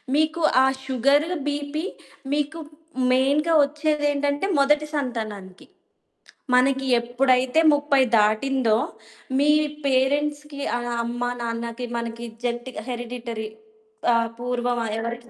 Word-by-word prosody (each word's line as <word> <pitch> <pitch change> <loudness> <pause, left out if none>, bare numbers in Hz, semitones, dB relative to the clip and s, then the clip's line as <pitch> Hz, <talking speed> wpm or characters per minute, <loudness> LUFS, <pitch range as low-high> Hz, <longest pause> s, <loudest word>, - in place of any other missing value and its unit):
మీకు 315 +2 +1 0.2
ఆ - - +5 0.2
sugar, 275 +3 +3 0.2
BP 290 +3 -3 0.5
మీకు 295 +3 -1 0.5
మెయిన్‌గా 285 +6 +2
ఒచ్చేదేంటంటే 290 +1 0
మొదటి 295 +2 +3
సంతానానికి. 215 -8 -5 0.9
మనకి 265 +1 +3
ఎప్పుడైతే 255 +4 +2
30 285 -2 +3 0.2
దాటిందో, 220 +2 +2 0.6
మీ 295 +1 +4 0.3
పేరెంట్స్‌కి 285 +2 0 0.2
ఆహ్, 240 0 -4
అమ్మ, 240 +1 -4 0.2
నాన్నకి 235 +1 -4
మనకి 235 0 -5 0.2
జెంటిక 240 +1 -3
హెరిడిటరీ 235 -2 -5 0.6
ఆహ్, 230 0 +1
పూర్వం 245 0 -1
ఆహ్, 215 - -3
ఎవరికి 235 +1 -5
260 Hz, 100 wpm, -24 LUFS, 235-290 Hz, 0.9 s, ఆ